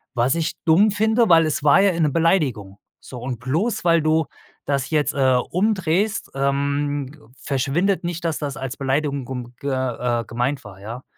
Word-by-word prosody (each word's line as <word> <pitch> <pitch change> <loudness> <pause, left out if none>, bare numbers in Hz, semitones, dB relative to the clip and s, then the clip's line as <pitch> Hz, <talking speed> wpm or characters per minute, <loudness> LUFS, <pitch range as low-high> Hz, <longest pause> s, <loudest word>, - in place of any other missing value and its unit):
Was 125 +5 +2
ich 165 -1 -1
dumm 190 +6 +5
finde, 220 +1 +2
weil 165 -1 +6
es 155 -2 -2
war 145 +5 +6
ja 200 -1 +4
eine 165 -3 +1
Beleidigung. 140 - 0 0.2
So 125 - -10
und 125 -2 -4
bloß, 165 - -1
weil 170 -1 +4
du 155 +1 +2 0.4
das 140 -1 -1
jetzt, 150 -2 +1
äh, 130 -2 +3 0.2
umdrehst, 195 +1 0
ähm, 140 -1 -2
verschwindet 145 +9 0
nicht, 170 0 -4
dass 165 -2 0
das 145 -2 -4
als 135 0 -5
Beleidigung 140 0 -1
gum 125 -1 -7
ge 140 - -3
äh, 125 -2 -1
gemeint 125 +4 -2
war, 95 -2 -12
ja? 115 +5 -7
145 Hz, 170 wpm, -22 LUFS, 130-165 Hz, 0.4 s, weil